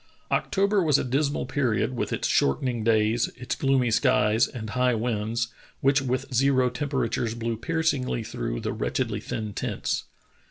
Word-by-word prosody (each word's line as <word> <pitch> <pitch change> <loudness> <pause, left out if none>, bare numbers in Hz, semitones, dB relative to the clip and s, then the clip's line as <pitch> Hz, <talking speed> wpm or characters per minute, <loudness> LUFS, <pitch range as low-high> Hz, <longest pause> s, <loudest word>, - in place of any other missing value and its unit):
October 200 +1 +2
was 150 -5 +4
a - - -1
dismal 140 +3 0
period 130 -2 0
with - - -2
its - - -1
shortening 120 - +1
daj's, 110 +1 +2
its 125 0 -3
gloomy 135 -3 +2
skies, 110 +2 +3
and 110 -4 -7
high 125 0 +2
winds, 115 0 -1 0.3
which 135 +1 +3
with 130 0 -1
zero 130 0 +3
tem 145 +3 -3
peratures 115 -4 -1
blew 115 0 -2
piercingly 140 -2 -1
through - - -4
the - - -3
wretchedly 105 - -1
thin 110 -1 -5
tents. - - -2
125 Hz, 155 wpm, -26 LUFS, 110-135 Hz, 0.3 s, was